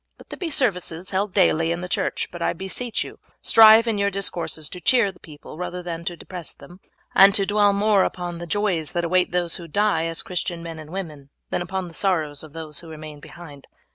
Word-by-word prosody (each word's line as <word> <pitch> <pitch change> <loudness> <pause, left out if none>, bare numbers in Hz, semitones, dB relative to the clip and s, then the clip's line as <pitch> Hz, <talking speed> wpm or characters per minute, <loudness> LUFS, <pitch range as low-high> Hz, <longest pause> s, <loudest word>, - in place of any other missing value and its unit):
Let - - -17
there - - -7
be 350 -4 -3
services 185 - 0
held 195 +1 0
daily 165 -4 +3
in 170 +1 -2
the 180 - -5
church, 180 - -1
but 175 - -9
I - - +1
beseech 190 +6 -2
you - - -11 0.2
strive 225 0 +8
in 220 -3 -1
your 200 0 +2
discourses 175 -5 -2
to 180 - -8
cheer 230 +1 +3
the 185 - -22
people 155 +1 -12
rather 180 0 -5
than 170 -1 -5
to 175 -1 -4
depress 180 -2 -7
them, 175 +6 -15 0.3
and 195 +1 +7
to 200 -3 +5
dwell 205 0 +3
more 200 0 +3
upon 175 -1 -4
the 175 - -7
joys 185 -5 0
that 175 -1 -1
await 180 +2 +2
those 175 -1 +1
who 170 -2 -9
die 200 -1 +1
as 165 0 -3
Christian 175 -1 -3
men 165 -1 -7
and 155 -1 -10
women 155 -7 -7 0.2
than - - -1
upon 185 +1 -4
the 170 - -12
sorrows 160 -7 0
of 155 -2 -10
those 155 -2 -4
who 165 - -11
remain 155 -1 -9
behind. 145 -3 -13
175 Hz, 225 wpm, -23 LUFS, 165-195 Hz, 0.3 s, strive